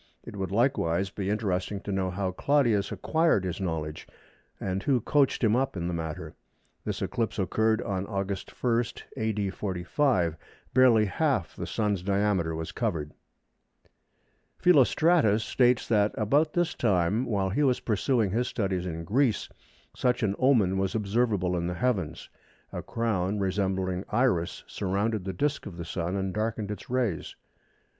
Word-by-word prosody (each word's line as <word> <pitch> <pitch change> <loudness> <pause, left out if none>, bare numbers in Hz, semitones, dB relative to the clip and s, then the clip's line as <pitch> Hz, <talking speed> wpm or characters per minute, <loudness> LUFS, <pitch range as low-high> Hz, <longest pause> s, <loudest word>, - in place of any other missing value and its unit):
It - - -9
would, 95 -2 -3
likewise, 95 -5 +1
be 100 -1 -3
interesting 100 -2 -1
to 100 - -5
know 95 -1 0
how 95 0 -2
Claudius 120 -2 +2
acquired 160 - +2
his 90 0 -3
knowledge, 80 -4 -3 0.5
and 95 0 -2
who 130 +1 +2
coached 140 +2 +2
him 110 0 +4
up 130 -5 0
in 85 0 -2
the 90 - -2
matter. 80 -2 -5 0.5
This - - -3
eclipse 115 -2 -2
occurred 110 +3 +1
on 95 -1 -3
August 100 -1 -3
1, 120 -1 +3 0.3
A.D. 105 -3 -1
45. 90 - 0 0.4
Barely 120 -4 +6
half 95 - 0
the - - -5
Sun's 105 -4 0
diameter 100 -4 +1
was 80 0 -4
covered. 80 -11 -2 1.5
Philostratus 150 - +4
states 125 0 +2
that 105 -2 +2
"about 145 +9 +2
this 175 -1 +1
time 100 +1 +1
while 100 -4 0
he 130 - 0
was 130 -4 +3
pursuing 110 -1 +1
his 120 +4 0
studies 95 -4 -2
in 85 -1 -4
Greece 115 +4 +1 0.5
such 125 -1 +1
an 100 -2 +2
omen 110 -8 +3
was 95 +2 -1
observable 105 -4 +1
in 85 0 -1
the 90 - -3
heavens. 95 -10 -1 0.5
A - - -3
crown 105 -4 -1
resembling 95 -1 -1
Iris 105 -8 +1
surrounded 100 +1 -1
the 95 - -2
disc 145 +7 -1
of 90 -4 -9
the 85 - -5
Sun 85 +2 -3
and 95 -1 -2
darkened 110 0 -2
its 105 - -7
rays." 120 -9 -1
100 Hz, 150 wpm, -28 LUFS, 95-120 Hz, 1.5 s, Barely